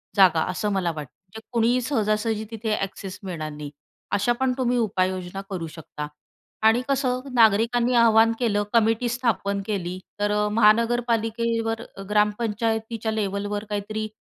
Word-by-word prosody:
जागा, 180 -5 +5
असं 195 +3 -2
मला 185 -3 0
वाटतं. 150 -4 -7
म्हणजे 195 +4 -12
कुणीही 240 +2 +3
सहजासहजी 220 -3 0
तिथे 220 -1 -2
अॅक्सेस 195 -1 -5
मिळणार 165 -5 -5
नाही. 150 -1 -7 0.4
अशा 205 +4 +2
पण 265 -1 +2
तुम्ही 250 -1 +1
उपाययोजना 185 -3 -1
करू 175 -4 -4
शकता 150 -1 -7 0.6
आणि 225 +2 +5
कसं, 265 -2 +1 0.2
नागरिकांनी 235 +2 +4
आव्हान 225 -1 +6
केलं 210 -4 +1
कमिटी 225 +1 +3
स्थापन 230 -5 0
केली 185 -4 -3 0.2
तर 205 0 +1
अ, 210 0 +1
महानगरपालिकेवर 230 0 +2 0.3
ग्रामपंचायतीच्या 220 +1 0
लेव्हलवर 205 -1 -2
काहीतरी 215 +1 -3
215 Hz, 130 wpm, -24 LUFS, 200-230 Hz, 0.6 s, आव्हान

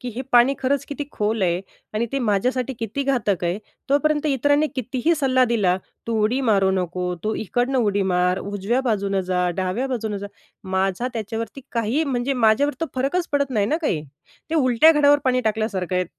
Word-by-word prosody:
की 250 - -5
हे 255 - -3
पाणी 245 +3 +6
खरंच 270 +1 0
किती 285 0 -4
खोल 210 0 -1
आहे 175 -1 +1 0.3
आणि 225 +2 0
ते 275 - 0
माझ्यासाठी 250 +3 0
किती 230 +5 -3
घातक 235 -10 0
आहे, 175 +3 -1 0.3
तोपर्यंत 295 +2 +2
इतरांनी 290 +2 +2
कितीही 260 +5 0
सल्ला 260 -4 +3
दिला, 210 -7 +2 0.3
तू 230 - -1
उडी 240 +5 +1
मारू 200 -6 +3
नको, 180 -1 -2
तू 215 +1 0
इकडनं 245 +5 -1
उडी 205 -4 +1
मार, 180 +1 +2
उजव्या 205 +5 -1
बाजूनं 200 -6 0
जा, 180 -1 0
डाव्या 190 +7 -1
बाजूनं 220 -5 -2
जा, 200 +1 -5 0.4
माझा 190 +5 0
त्याच्यावरती 225 +2 -5
काही, 235 +6 0
म्हणजे 260 -1 -1
माझ्यावर 250 +3 +3
तो 330 - 0
फरकच 280 +7 -1
पडत 280 -1 +1
नाही 210 -5 +1
ना 305 - +1
काही. 155 - -1 0.5
ते - - -1
उलट्या 270 +1 +5
घड्यावर 290 -1 +5
पाणी 255 -1 +2
टाकल्यासारखं 215 -5 -1
आहे. 180 - +1
235 Hz, 180 wpm, -22 LUFS, 200-270 Hz, 0.5 s, पाणी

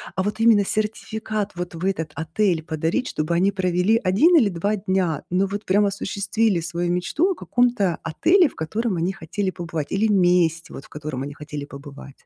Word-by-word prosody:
А 190 - 0
вот 210 +2 -3
именно 225 -3 +5
сертификат 215 0 -3
вот 175 -1 -5
в 165 +3 -4
этот 165 -5 -1
отель 165 +1 0
подарить, 160 - -1
чтобы 155 +3 -1
они 190 +4 +3
провели 185 +3 +1
1 235 - +4
или 240 -11 +5
2 200 +4 -1
дня, 185 -5 -1
но 185 +2 +2
вот 205 +2 -5
прям 205 +2 +3
осуществили 200 0 0
свою 170 +1 -2
мечту 300 - +1
о - - -2
каком-то 240 - +1
отеле, 340 - +3
в - - -20
котором 210 +5 -2
они 170 +3 0
хотели 190 +3 -3
побывать, 165 -4 -5
или 205 +3 +2
месте, 175 -4 +2
вот, 135 - -9
в - - -19
котором 150 -3 -6
они 145 +1 -7
хотели 150 -1 -7
побывать. 140 -1 -12
185 Hz, 185 wpm, -23 LUFS, 165-210 Hz, -, именно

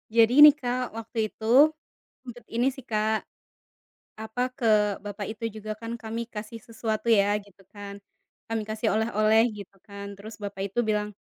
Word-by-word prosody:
Jadi 235 +5 +6
nih 300 -1 +11
Kak, 250 -2 -2
waktu 225 +1 -8
itu, 220 - -10 0.8
sempet 245 -2 -11
ini 240 +2 +2
sih 265 - -11
Kak, 215 -2 0 0.9
apa 220 +2 -6 0.2
ke 255 - -6 0.4
bapak 205 0 -5
itu 225 +1 -9
juga 215 0 -7
kan 230 0 -5
kami 225 0 -5
kasih 215 +2 -7
sesuatu 220 -1 -3
ya 205 -1 +4
gitu 200 -1 -22
kan, 205 -1 -8 0.5
kami 225 -1 -1
kasih 220 +1 -1
oleh-oleh 220 0 +3
gitu 200 -1 -11
kan 200 -1 -8
terus 215 +3 -10
bapak 200 -1 -5
itu 240 - -5
bilang, 210 -1 0
220 Hz, 160 wpm, -26 LUFS, 210-230 Hz, 0.9 s, nih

